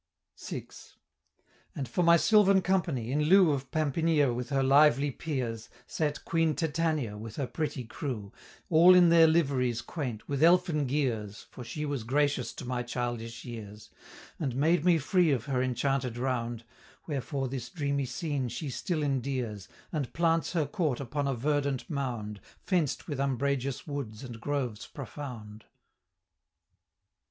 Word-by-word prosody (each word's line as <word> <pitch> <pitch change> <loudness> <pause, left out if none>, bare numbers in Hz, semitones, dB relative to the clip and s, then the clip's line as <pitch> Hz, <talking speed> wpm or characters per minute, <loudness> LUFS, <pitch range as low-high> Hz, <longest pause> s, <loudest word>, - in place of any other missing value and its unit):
VI. - - -5 1.1
And 135 - -3
for 120 - -1
my 170 0 +6
sylvan 195 0 +5
company, 165 -11 0
in 150 +2 +1
lieu 185 0 +6
Of 135 -2 -3
Pampinea 155 -2 +2
with 125 +2 -4
her 135 -2 +1
lively 140 0 +5
peers, 125 -7 -4 0.2
Sate 150 -2 -2
Queen 165 -2 +1
Titania 155 -9 -1
with 110 0 -8
her 140 - -2
pretty 150 -1 -3
crew, 110 -4 -5 0.4
All 175 +3 +8
in 175 -1 +7
their 165 -1 +7
liveries 135 -7 +1
quaint, 125 -9 -5
with 140 -1 -2
elfin 170 -3 +4
gears, 115 -7 -2
For 125 - -9
she 150 +5 -4
was 140 -5 -3
gracious 140 +1 +1
to - - -8
my 125 0 -2
childish 120 -1 -4
years, 110 -3 -9 0.5
And 135 -6 -2
made 155 +4 +2
me 175 -1 +5
free 175 +3 +2
of 125 -6 0
her 130 -3 0
enchanted 130 -1 -1
round; 120 -2 -2 0.4
Wherefore 135 -2 -3
this 125 -2 -5
dreamy 140 -3 -1
scene 130 +1 -2
she 145 +3 -5
still 160 - -2
endears, 130 -7 -2 0.2
And 150 -6 -2
plants 165 0 +1
her 160 -4 +1
court 150 - -1
upon 140 +2 -2
a 135 - 0
verdant 140 +1 -1
mound, 120 - -3 0.2
Fenced 175 -8 0
with 145 -5 -4
umbrageous 140 +1 -1
woods 140 -7 -5
and 120 -3 -8
groves 130 -6 -3
profound. 120 -7 -8
140 Hz, 145 wpm, -29 LUFS, 120-155 Hz, 1.1 s, All